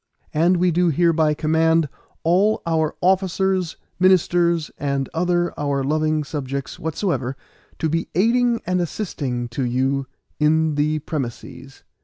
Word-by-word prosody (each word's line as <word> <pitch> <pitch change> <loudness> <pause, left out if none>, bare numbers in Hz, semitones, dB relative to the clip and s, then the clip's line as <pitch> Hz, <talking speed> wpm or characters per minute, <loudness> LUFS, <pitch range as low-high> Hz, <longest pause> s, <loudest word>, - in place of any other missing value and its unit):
And 170 +4 +3
we 180 0 +2
do 175 +1 +2
hereby 160 -1 +2
command 160 +1 +2 0.4
all 190 +6 +2
our 160 -2 0
officers, 190 -1 +1 0.2
ministers, 175 -3 +3
and 140 -1 -1
other 175 +1 0
our 140 -2 0
loving 155 +2 +1
subjects 140 -2 -5
whatsoever, 160 -5 -2 0.4
to 160 - 0
be 165 +2 -1
aiding 235 +4 +2
and 180 0 0
assisting 140 - -3
to 125 +3 -3
you 130 +2 0 0.3
in 155 +1 +3
the 150 +1 +1
premisses. 135 -1 -6
160 Hz, 125 wpm, -22 LUFS, 145-175 Hz, 0.4 s, And